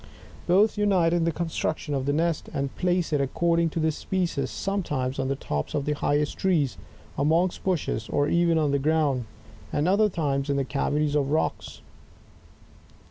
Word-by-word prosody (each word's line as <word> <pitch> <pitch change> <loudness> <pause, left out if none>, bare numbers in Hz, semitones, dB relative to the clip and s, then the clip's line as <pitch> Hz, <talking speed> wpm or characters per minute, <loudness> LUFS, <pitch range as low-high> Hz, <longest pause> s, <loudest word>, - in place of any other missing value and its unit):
Both 205 +4 +3
unite 185 -5 +3
in 170 -1 +2
the 165 - +2
construc 160 -1 -2
tion 150 - -5
of 135 -1 -2
the - - +3
nest, 165 +2 0
and 140 -1 -2
place 180 -3 0
it, 145 - +2
according 170 +4 +1
to 165 - -4
the 160 0 +2
species, 170 -5 -2
sometimes 145 -10 -2
on 135 - 0
the 140 - 0
tops 75 - -4
of 140 - -1
the 150 - 0
highest 145 0 0
trees, 165 -9 +1 0.4
amongst 165 +5 +1
bushes, 155 - -1
or 145 0 +1
even 170 0 +3
on 150 -3 +2
the 140 - +1
ground, 145 -4 +1 0.5
and 150 +3 0
other 205 +3 +4
times 145 -5 -1
in 140 - +1
the 135 - 0
cavities 145 +2 0
of 140 -2 +1
rocks. 155 +2 -2
155 Hz, 180 wpm, -26 LUFS, 140-170 Hz, 0.5 s, other